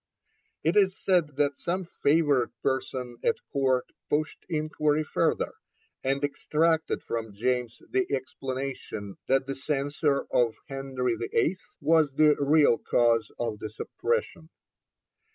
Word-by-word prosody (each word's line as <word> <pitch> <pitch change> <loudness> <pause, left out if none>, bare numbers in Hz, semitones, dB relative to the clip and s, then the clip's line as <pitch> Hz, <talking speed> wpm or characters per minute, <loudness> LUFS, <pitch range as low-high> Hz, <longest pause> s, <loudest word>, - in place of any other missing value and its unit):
It 165 +4 +2
is 190 -2 +4
said 170 -7 +2
that 145 -1 +1
some 180 +2 -2 0.2
favoured 145 -4 +3
person 130 -2 -2
at - - +3 0.2
Court 130 -2 +2 0.2
pushed 150 0 -1
inquiry 155 -1 +1
further, - - 0 0.5
and 135 +2 0
extracted 160 +3 +1
from 110 -3 -4
James 120 +1 -1
the 385 -1 +1
explanation 130 -6 -4
that 135 0 +3
the 135 - -2
censure 145 +1 0
of 120 -3 +2
Henry 135 -3 -2
VIII. 120 - +1 0.3
was 155 -1 +4
the 150 +1 +5
real 145 -3 +4
cause 115 -1 +2
of 115 -3 -3
the 110 - -5
suppression. 470 - -3
140 Hz, 120 wpm, -28 LUFS, 125-155 Hz, 0.5 s, the